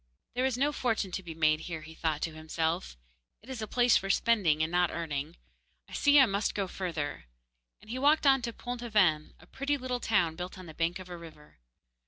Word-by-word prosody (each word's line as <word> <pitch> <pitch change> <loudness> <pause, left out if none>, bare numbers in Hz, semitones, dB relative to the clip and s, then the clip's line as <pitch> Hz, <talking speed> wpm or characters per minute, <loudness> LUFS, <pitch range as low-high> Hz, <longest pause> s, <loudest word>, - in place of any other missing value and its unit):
'There 255 +2 +1
is 255 -2 -2
no 285 +3 +2
fortune 225 -8 -1
to 190 - -3
be 170 -3 -8
made 155 -1 +3
here,' 160 -1 -6
he 160 +1 -11
thought 160 -2 -2
to 165 - -2
himself; 160 - -2 0.5
'it 245 - -15
is 250 -4 -5
a 215 - -3
place 245 +2 +4
for 195 - -4
spending, 195 -9 +3
and 160 - -2
not 175 -1 +3
earning. 155 -1 -4 0.5
I - - -15
see 285 0 +5
I 265 - +8
must 200 -1 -1
go 200 -2 -1
further,' 160 - -4 0.6
and 215 - -11
he 255 - -3
walked 295 +3 +4
on 270 -1 +5
to 235 -1 -3
Pont 245 +1 -6
aven, 190 -10 +2
a - - -17
pretty 280 +2 -2
little 255 -2 -3
town 175 -9 +1
built 180 +2 -6
on 185 - -9
the 160 - -10
bank 165 +3 0
of 185 -1 -10
a 180 - -7
river. 155 - -14
185 Hz, 225 wpm, -30 LUFS, 160-245 Hz, 0.6 s, I